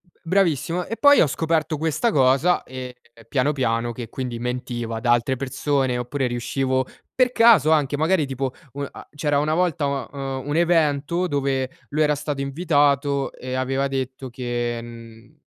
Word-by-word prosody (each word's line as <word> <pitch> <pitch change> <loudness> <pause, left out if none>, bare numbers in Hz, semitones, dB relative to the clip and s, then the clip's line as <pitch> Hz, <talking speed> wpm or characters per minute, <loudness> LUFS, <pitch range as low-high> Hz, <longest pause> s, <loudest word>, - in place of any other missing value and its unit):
B 175 - -34
bravissimo 175 -1 +1
e 230 - -5
poi 285 0 +6
ho - - +4
scoperto 160 +1 0
questa 160 +10 0
cosa, 135 +5 +3
ehm, 130 -1 -7 0.4
piano, 135 +3 +1
piano 120 -3 0
che, 115 -1 -7
quindi 125 -1 -4
mentiva 120 -2 -3
ad 115 - -8
altre 120 +2 +3
persone 130 0 -1
oppure 125 +2 -2
riuscivo 130 +2 -1 0.3
per 255 -1 +3
caso, 225 - +6
anche 145 -2 +2
magari 160 +1 +2
tipo 135 0 -3 0.2
un 140 0 -4
a - - -12
c'era 145 -1 0
una 150 +2 0
volta 165 -3 +1
un 140 -3 -2
uhm, 135 -1 -5
un 145 - -1
evento 165 0 +2
dove 135 -4 -1 0.2
lui 155 +2 -1
era 150 0 +2
stato 145 -1 -4
invitato 140 -2 +1
e 130 0 -7
aveva 135 +1 0
detto 130 -1 -4
che, 120 -1 -3
mhmm 115 +3 -13
140 Hz, 165 wpm, -23 LUFS, 130-155 Hz, 0.4 s, poi